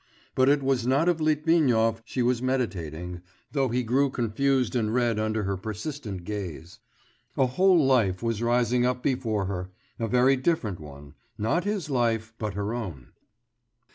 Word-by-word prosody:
But 130 +1 +4
it 140 -1 +3
was 130 -3 +1
not 140 +6 +3
of 170 -2 +2
Litvinov 150 -8 +2
she 125 +2 -2
was 120 0 +1
meditating, 90 - -3 0.3
though 135 -2 +1
he 125 +2 0
grew 135 +4 +2
confused 130 +1 0
and 110 -3 +1
red 120 -2 +1
under 110 0 -1
her 100 0 -1
persistent 110 - -6
gaze. 90 -4 -6 0.6
A 135 - +4
whole 180 +9 +4
life 115 -8 +2
was 115 -2 -1
rising 120 +1 +2
up 125 0 0
before 115 -7 0
her, 90 -1 -4 0.3
a 115 - -1
very 125 +3 +4
different 130 - -1
one, 70 -2 -11 0.2
not 115 - 0
his 205 -5 -2
life, 115 -4 0
but 105 -4 -3
her 100 +2 -2
own. 90 - -6
120 Hz, 160 wpm, -26 LUFS, 105-135 Hz, 0.6 s, But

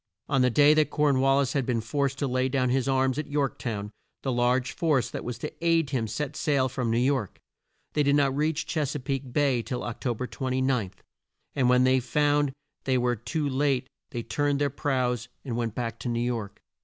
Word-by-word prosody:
On 135 -2 +2
the 125 - +4
day 145 +4 +6
that 155 -1 +3
Corn 145 -3 +2
wal 135 +1 +4
lis 140 -3 +1
had 140 - +1
been 120 -1 0
forced 135 +4 -1
to 140 - -1
lay 130 +1 0
down 130 -1 +1
his 130 +1 +1
arms 130 0 +2
at 155 - -4
York 145 -2 -1
town, 105 -4 -4 0.3
the 135 - 0
large 125 +1 +1
force 155 -7 +1
that - - -5
was 125 -2 -4
to 150 - -5
aid 165 -4 +2
him 120 -5 0
set 150 +6 -4
sail 140 -4 +1
from 125 -2 -2
New 115 - +1
York. 125 -5 0 0.5
They 150 - +2
did 140 0 +3
not 140 -2 +2
reach 155 +2 0
Ches 150 -3 -2
a - - -2
peake 135 0 -3
Bay 135 -3 +2
till 125 +2 -4
Oc 120 - -6
to 120 -3 0
ber 125 - -3
29, 130 -5 -1 0.7
and 130 -3 +3
when 125 0 +5
they 130 0 +4
found 145 +3 +1 0.3
they 130 -1 +2
were 125 0 +1
too 120 +7 -2
late 135 -1 +1 0.2
they 120 -2 -4
turned 145 +5 0
their 145 -1 +1
prows 125 -4 -1 0.2
and 120 -4 -3
went 115 -2 -2
back 115 -2 -3
to 125 - -4
New 120 0 -1
York. 115 -5 -4
130 Hz, 220 wpm, -27 LUFS, 125-145 Hz, 0.7 s, day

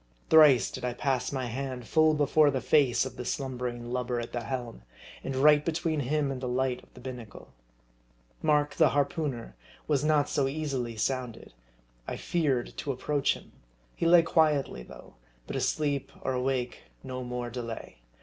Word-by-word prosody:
Thrice 145 -9 +7
did 130 - -7
I 125 -1 -1
pass 130 -3 -1
my 130 -2 -2
hand 125 0 -5
full 155 +3 +4
before 150 +1 +4
the 135 -2 0
face 135 -3 +3
of 130 -1 -7
the 125 - -4
slumbering 125 -2 -4
lubber 125 -1 -1
at 120 - -5
the 120 - -3
helm, 120 - -5 0.4
and 135 - -3
right 145 +2 +5
be 165 - 0
tween 160 -2 -1
him 145 +1 0
and 130 -2 -5
the 130 - -3
light 125 0 0
of - - -23
the - - -11
binnacle. 125 -3 -9 0.9
Mark, 150 -1 +2
the - - +4
harpooneer, 145 -4 -1 0.3
was 145 -2 +1
not 150 -2 +3
so 135 -2 +1
easily 135 -5 -3
sounded. 125 0 -3 0.5
I - - -4
feared 140 -8 0
MARDI. - - -14
41 - - -26
to 140 - -2
approach 140 +2 0
him. - - -14 0.4
He 165 - 0
lay 170 0 +7
quietly, 155 - +2
though; - - -13 0.3
but - - -6
asleep 145 -3 -1
or - - -1
awake, 125 -1 -2 0.2
no 130 -1 -5
more 125 -1 -4
delay. 115 - -6
130 Hz, 180 wpm, -29 LUFS, 125-145 Hz, 0.9 s, Thrice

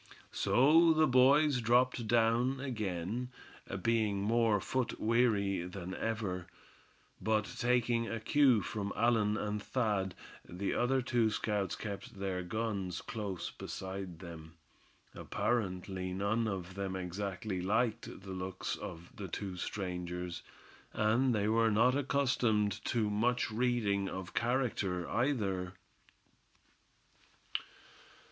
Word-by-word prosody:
So 160 +6 +5
the 155 0 +4
boys 135 +1 +5
dropped 120 0 +2
down 120 +3 +3
again, 110 -2 -3 0.5
being 110 -3 +2
more 115 -1 +3
foot 130 +4 -2
weary 110 -5 +2
than 90 +1 -6
ever. 100 -6 -2 0.7
But 110 +2 +2 0.2
taking 120 -1 +2
a 115 - -3
cue 125 -1 +4
from 100 -2 -3
Allan 110 -2 +2
and 105 -1 -2
Thad, 105 -6 -1 0.3
the 95 +3 -3
other 130 +1 +1
two 120 -2 +2
scouts 105 -2 -1
kept 100 -2 -7
their 95 -2 -2
guns 100 -1 -2
close 100 -6 -4
beside 95 -2 -6
them. 80 -2 -10 0.6
Apparently 95 -5 -2
none 100 +4 0
of 95 -3 -4
them 95 -1 -3
exactly 95 +1 -3
liked 110 +1 -1
the 95 - -7
looks 95 0 -3
of 85 +1 -9
the 100 - -6
two 95 +2 -4
strangers; 90 -2 -4 0.5
and 115 +4 +2
they 105 0 +1
were 115 +1 +3
not 115 +5 +4
accustomed 120 -7 +1
to 115 -3 +1
much 115 +4 +1
reading 110 -4 +1
of 95 -1 -6
character, 115 -8 0
either. 100 -8 0
105 Hz, 110 wpm, -33 LUFS, 95-120 Hz, 0.7 s, So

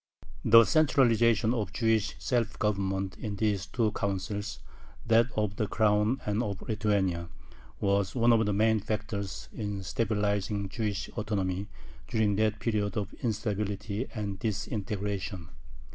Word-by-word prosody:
The 115 +1 +8
centralization 115 -7 +4
of 105 -5 -2
Jewish 110 -4 +1
self 115 +9 -1
government 95 -2 -1
in 105 -2 -4
these 100 -2 0
two 115 -4 0
Councils 100 +1 -3 0.5
that 115 +1 +5
of 105 -2 0
the 105 - 0
Crown 105 +4 +2
and 105 +2 0
of 100 -4 -4
Lithuania 100 -6 0 0.5
was 100 -1 +1
one 120 -1 +5
of 110 -1 +4
the - - +1
main 110 +2 +3
factors 105 -1 -4
in 105 -3 -4
stabilizing 105 -1 -1
Jewish 105 -3 -2
autonomy 100 -3 -2 0.4
during 110 -2 +1
that 110 0 +2
period 105 -3 -1
of 105 0 -3
instability 105 0 -2
and 100 -3 -3
disintegration. 100 -4 -3
105 Hz, 130 wpm, -29 LUFS, 100-110 Hz, 0.5 s, The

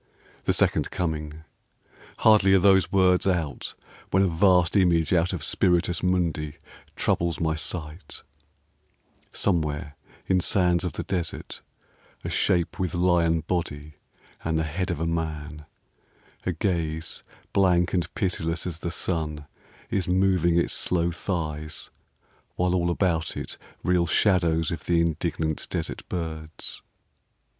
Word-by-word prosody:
The - - +3
Second - - +2
Coming! 80 -2 -3 0.7
Hardly 105 -3 +5
are - - +6
those 95 0 +4
words 95 -1 +3
out 80 -8 -1 0.3
When 95 +1 +3
a - - +3
vast 90 +1 +3
image 85 -4 +3
out 85 +1 +3
of 90 -6 -3
Spiritus 90 -1 +2
Mundi 85 -4 0 0.4
Troubles 85 -1 0
my 80 -1 +1
sight: 80 +1 -3 1.1
somewhere 75 -5 -1 0.3
in 95 - +2
sands 90 -1 +3
of 90 - -2
the - - -4
desert 90 -4 -3 0.6
A - - -4
shape 85 -2 +1
with 90 -2 -1
lion 85 -2 +3
body 75 -3 -3 0.5
and 80 0 0
the 80 - +1
head 85 +4 -3
of - - -2
a 80 - -1
man, 75 -2 -4 0.8
A - - +2
gaze 80 -3 -2 0.3
blank 90 -3 +3
and 85 -3 0
pitiless 85 -3 -1
as 85 -3 -4
the 85 - -3
sun, 75 -4 -3 0.5
Is 95 -3 0
moving 90 -2 +3
its 85 - +1
slow 85 -1 +1
thighs, 80 -3 -4 0.6
while 90 0 +1
all 85 -1 +1
about 85 -3 0
it - - -5 0.3
Reel 90 -1 +2
shadows 85 -4 +2
of 85 - -5
the 85 -1 +2
indignant 80 -1 -1
desert - - -4
birds. 80 -3 -5
85 Hz, 130 wpm, -26 LUFS, 80-90 Hz, 1.1 s, are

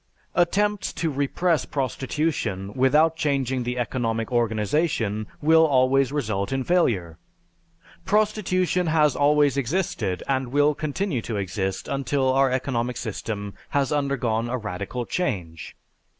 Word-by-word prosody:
Attempts 205 +4 +1
to 165 -1 -1
repress 145 +3 0
prostitution 130 -7 -2
without 150 +6 +3
changing 135 -5 0
the 125 +1 -3
economic 115 -2 -2
organization 110 - 0 0.2
will 160 +1 +6
always 135 -2 +3
result 110 -9 -2
in 135 0 -1
failure. 100 - +1 0.8
Prostitution 185 -4 +1
has 155 -3 +3
always 145 -1 +3
existed 125 - -1
and 130 -1 0
will 145 +4 +3
continue 155 - -2
to 110 -1 -4
exist 95 0 -3
until 135 -1 0
our 135 0 +4
economic 125 -2 -1
system 105 -2 -5 0.2
has 140 -1 0
undergone 125 -6 0
a 130 - -1
radical 105 +3 -4
change. 90 - -3
135 Hz, 120 wpm, -24 LUFS, 115-150 Hz, 0.8 s, will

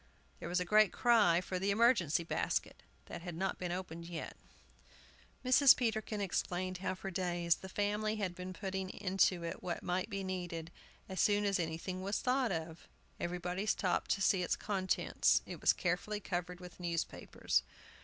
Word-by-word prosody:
There - - -6
was 180 +1 +1
a 180 - -1
great 215 +1 +5
cry 210 -8 +4
for 185 0 -3
the 195 +2 0
"emergency 200 - +3
basket," 165 - -2 0.2
that 175 - -7
had 175 -1 -6
not 190 +3 -2
been 180 -1 -3
opened 170 -2 -5
yet. 170 -2 -6 1.1
Mrs. 255 +1 +8
Peterkin 220 -3 -1
explained 185 -1 -2
how 185 0 -2
for 190 +1 -6
days 175 -2 +1
the 190 - -9
family 210 +2 0
had 200 -4 -2
been 180 +1 -6
putting 190 0 -4
into 190 -2 +1
it 165 - -5
what 175 -1 -4
might 180 +3 -1
be 195 -2 -3
needed, 175 -3 -4 0.4
as 190 - -5
soon 205 0 +3
as 200 -2 +1
anything 170 +3 -3
was 200 +2 -1
thought 255 -2 +1
of. 160 -1 -5 0.3
Everybody 180 +3 -3
stopped 185 -4 +1
to 195 - -3
see 190 -1 +3
its 175 - 0
contents. 190 -3 +1
It - - -8
was - - +6
carefully 195 +4 -1
covered 180 -2 -4
with 180 0 -11
newspapers. 170 -2 -1
185 Hz, 170 wpm, -34 LUFS, 175-205 Hz, 1.1 s, Mrs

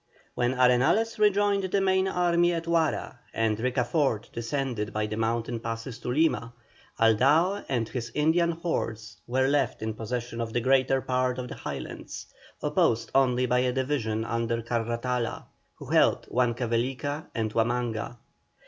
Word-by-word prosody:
When 125 +1 0
Arenales 130 - +3
rejoined 205 -1 +3
the 190 +2 +1
main 190 0 +2
army 175 -1 +2
at 165 -1 -2
Huara, 165 -2 0 0.2
and 110 -1 +1
Ricafort 125 -1 0
descended 115 -3 -3
by 110 0 0
the 105 0 -4
mountain 115 +1 -1
passes 115 +1 -5
to - - -9
Lima, 125 -5 +1 0.5
Aldao 145 - +3
and 120 -4 0
his 120 -1 -5
Indian 160 +3 +3
hordes 115 -11 -3
were 130 +2 +2
left 135 -5 0
in 110 0 -2
possession 115 +1 -4
of 115 -1 -4
the 120 - +2
greater 130 +1 +3
part 125 0 0
of 125 -1 -5
the - - -6
Highlands, - - -7 0.4
opposed 115 0 +1
only 125 -2 +3
by 125 0 +2
a 125 0 +2
division 125 -5 -1
under 115 0 -1
Carratala, 120 +1 -2 0.3
who - - -10
held - - +3
Huancavelica 125 +4 -1
and 110 -2 -1
Huamanga. 120 0 -1
125 Hz, 145 wpm, -27 LUFS, 115-145 Hz, 0.5 s, Arenales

